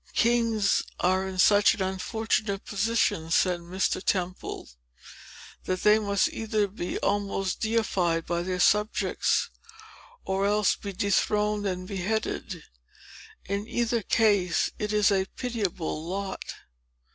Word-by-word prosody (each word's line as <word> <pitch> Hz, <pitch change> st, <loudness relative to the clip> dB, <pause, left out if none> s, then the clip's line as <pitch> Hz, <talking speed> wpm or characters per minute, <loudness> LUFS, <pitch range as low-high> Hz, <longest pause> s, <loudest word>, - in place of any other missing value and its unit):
"Kings 230 Hz, -4 st, +2 dB, 0.2 s
are 185 Hz, +1 st, +1 dB
in 190 Hz, -1 st, -6 dB
such 205 Hz, +3 st, +5 dB
an 210 Hz, -, -6 dB
unfortunate 200 Hz, +1 st, -2 dB
position," 205 Hz, -6 st, 0 dB
said 180 Hz, +1 st, +2 dB
Mr. 185 Hz, +2 st, -2 dB
Temple, 185 Hz, -1 st, -2 dB, 1.0 s
"that 185 Hz, 0 st, -2 dB
they 210 Hz, +1 st, +6 dB
must 200 Hz, -2 st, +1 dB
either 215 Hz, -2 st, 0 dB
be 190 Hz, -2 st, -5 dB
almost 195 Hz, -2 st, -1 dB
deified 190 Hz, -7 st, 0 dB
by 170 Hz, 0 st, -1 dB
their 180 Hz, +1 st, -3 dB
subjects, 210 Hz, +4 st, +2 dB, 0.7 s
or 195 Hz, +1 st, 0 dB
else 210 Hz, -1 st, +2 dB
be 200 Hz, -, -7 dB
dethroned 210 Hz, +1 st, +1 dB
and 185 Hz, -1 st, -4 dB
beheaded. 200 Hz, +3 st, -3 dB, 0.8 s
In 200 Hz, +2 st, -3 dB
either 235 Hz, -1 st, 0 dB
case 200 Hz, -4 st, +2 dB
it 210 Hz, 0 st, -2 dB
is 210 Hz, -1 st, +3 dB
a 190 Hz, -1 st, +1 dB
pitiable 200 Hz, -10 st, -3 dB
lot." 190 Hz, +3 st, -4 dB
200 Hz, 120 wpm, -27 LUFS, 185-215 Hz, 1.0 s, they